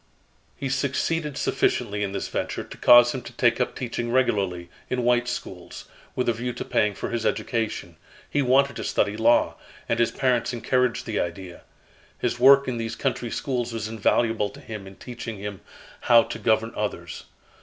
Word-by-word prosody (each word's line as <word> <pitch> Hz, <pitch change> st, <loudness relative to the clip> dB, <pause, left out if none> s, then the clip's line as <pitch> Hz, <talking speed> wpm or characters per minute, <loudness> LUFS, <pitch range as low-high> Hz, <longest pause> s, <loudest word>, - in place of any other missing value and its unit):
He 135 Hz, -, -3 dB
succeeded 140 Hz, +3 st, -1 dB
sufficiently 105 Hz, 0 st, 0 dB
in 100 Hz, -1 st, -1 dB
this 100 Hz, -, -3 dB
venture, -, -, -3 dB
to -, -, -11 dB
cause 120 Hz, 0 st, +7 dB
him 130 Hz, -, -4 dB
to 120 Hz, -, -10 dB
take 120 Hz, 0 st, +2 dB
up 125 Hz, -, -1 dB
teaching 120 Hz, -2 st, -3 dB
regularly, 100 Hz, -9 st, +1 dB, 0.2 s
in 125 Hz, -1 st, -1 dB
white 120 Hz, 0 st, +2 dB
schools, 120 Hz, -, -6 dB, 0.3 s
with 125 Hz, -, -1 dB
a 120 Hz, -, +3 dB
view 120 Hz, +2 st, -4 dB
to 120 Hz, -, -6 dB
paying 105 Hz, -1 st, +1 dB
for -, -, -5 dB
his 120 Hz, -1 st, -2 dB
education. 110 Hz, -10 st, -2 dB, 0.3 s
He 145 Hz, -, 0 dB
wanted 140 Hz, +2 st, +3 dB
to -, -, -4 dB
study 105 Hz, 0 st, 0 dB
law, 115 Hz, +2 st, +3 dB, 0.3 s
and 115 Hz, -, 0 dB
his 120 Hz, -, +3 dB
parents 125 Hz, -2 st, 0 dB
encouraged 125 Hz, +1 st, 0 dB
the 110 Hz, -, -2 dB
idea. 85 Hz, +1 st, -5 dB, 0.6 s
His 120 Hz, -, -2 dB
work 140 Hz, +2 st, +7 dB
in 125 Hz, -2 st, -2 dB
these 115 Hz, 0 st, -3 dB
country 120 Hz, -, -2 dB
schools 120 Hz, -2 st, -2 dB
was 110 Hz, -1 st, -3 dB
invaluable 110 Hz, 0 st, +1 dB
to -, -, -13 dB
him 105 Hz, -3 st, -8 dB
in 95 Hz, -, -12 dB
teaching 120 Hz, -2 st, -7 dB
him 100 Hz, -1 st, -6 dB, 0.4 s
how 120 Hz, -1 st, +6 dB
to -, -, -7 dB
govern 110 Hz, 0 st, +1 dB
others. 85 Hz, -5 st, -4 dB
120 Hz, 180 wpm, -25 LUFS, 105-125 Hz, 0.6 s, cause